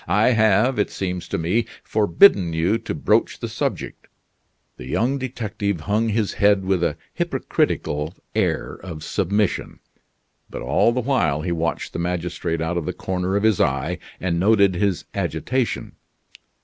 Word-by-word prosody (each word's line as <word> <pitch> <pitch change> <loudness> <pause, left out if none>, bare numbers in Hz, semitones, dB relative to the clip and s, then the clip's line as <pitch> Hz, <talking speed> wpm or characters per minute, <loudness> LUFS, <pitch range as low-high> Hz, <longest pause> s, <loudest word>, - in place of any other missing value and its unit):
I 105 +4 +4
have, 110 +2 +3
it 105 - +1
seems 90 -2 -4
to - - -2
me, 90 +8 0 0.2
forbidden 105 - +4
you 85 +8 +1
to 115 - -5
broach 75 - +1
the - - -4
subject." - - -4 0.7
The 60 - -9
young 130 - 0
detective 105 - -3
hung 105 +5 0
his 105 -1 0
head 100 -2 +4
with 95 -2 +1
a - - 0 0.2
hypocritical 75 +3 -1 0.2
air - - -1
of 80 -4 -8
submission. 100 +4 -1 0.7
But - - -6
all 90 - +3
the 125 +1 -1
while 90 - +1
he 90 - -2
watched 85 -2 -2
the - - -3
magistrate 85 -1 -2
out 80 +2 -1
of 85 - -3
the - - -1
corner 95 0 -2
of 100 - +1
his 110 -3 +3
eye 70 0 0 0.2
and 85 -2 -1
noted 100 0 +4
his 95 0 0
agitation. 130 -1 -2
95 Hz, 155 wpm, -22 LUFS, 85-110 Hz, 0.7 s, I